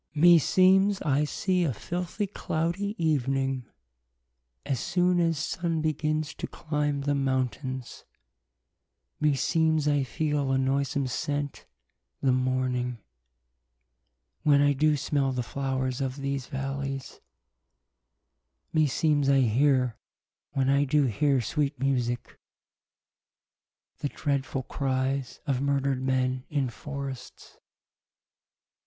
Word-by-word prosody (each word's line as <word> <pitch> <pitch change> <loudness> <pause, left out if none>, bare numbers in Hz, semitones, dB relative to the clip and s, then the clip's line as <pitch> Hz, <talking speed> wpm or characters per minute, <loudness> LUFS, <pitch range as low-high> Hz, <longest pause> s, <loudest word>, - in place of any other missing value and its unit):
Klaius. 150 - -3
Me 175 -1 +9
seemes 190 +5 +4
I 145 0 +2
see 185 +4 0
a 165 - +1
filthie 175 - -3
clow 165 +1 -1
die 200 +4 -4
evening, 135 -5 0 1.0
As 135 -4 -1
soon 180 +2 +2
as 165 -2 +2
Sunne 165 +2 -1
begins 155 0 -1
to - - -5
clime 150 -2 -2
the 145 +1 0
mountaines: 130 -1 -2 1.2
Me 150 -2 +3
seemes 160 +1 +2
I 145 -1 +3
feele 145 0 -1
a - - +3
noysome 135 +1 0
sent, 145 +3 -3 0.5
the 135 - +2
morning 130 -1 0 1.4
When 145 -1 +4
I 145 0 +4
doo 150 +2 +2
smell 140 -1 0
the 125 -1 -1
flowers 130 0 -2
of 130 -1 -2
these 140 -2 -3
v 135 - -5
allies: 135 0 -4 1.5
Me 155 -2 +4
seemes 145 0 +2
I 135 -1 +5
heare, 125 0 +2 0.5
when 135 -2 +1
I 140 +1 +4
doo 145 +1 +2
heare 135 +3 +2
sweet 145 +5 -1
e - - -4
musique, 120 -3 -1 1.6
The 145 - -2
dreadfull 140 -2 -2
cries 135 0 -2
of 135 -4 0
murdred 140 -1 0
men 130 -1 0
in 140 -4 0
forrests. 140 -1 -7
Strephon. - - -20
140 Hz, 120 wpm, -27 LUFS, 130-150 Hz, 1.6 s, Me